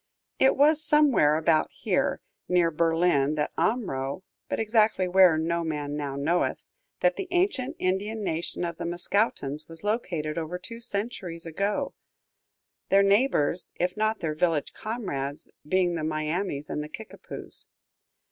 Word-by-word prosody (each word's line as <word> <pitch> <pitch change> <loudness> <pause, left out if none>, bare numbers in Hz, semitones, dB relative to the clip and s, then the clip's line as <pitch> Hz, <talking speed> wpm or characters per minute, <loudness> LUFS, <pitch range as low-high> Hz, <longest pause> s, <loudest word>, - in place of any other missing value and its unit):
It 265 - +4
was 305 +2 +5
somewhere 290 - +5
about 160 0 +2
here, - - 0 0.3
nearer 175 -2 +3
Berlin 165 -3 +2
than 150 -1 0
Omro, 165 - -1 0.3
but - - -1
exactly 215 -4 +2
where, 180 -3 +6
no 170 +2 0
man 150 -2 -3
now 145 -2 -3
knoweth, 160 +6 0 0.4
that - - +3
the 390 - -4
ancient 355 -7 0
Indian 205 +4 -1
"nation" 170 0 -2
of 170 -1 -4
the - - -5
Mascoutins 170 -4 -1
was 165 +2 -9
located 170 -8 -1
over 165 +2 -4
two 230 +6 -8
centuries 200 -7 -4
ago; 200 - -1 1.0
their 195 +1 +5
neighbors, 195 - +2
if 180 +1 -1
not 215 0 0
their 155 -2 -1
village 160 -1 0
comrades, 150 - -4 0.2
being 180 +1 +2
the 165 -2 -3
Miamis 155 0 -2
and 150 - -3
the 150 - -8
Kickapoos. 220 +7 -7
175 Hz, 140 wpm, -27 LUFS, 155-215 Hz, 1.0 s, where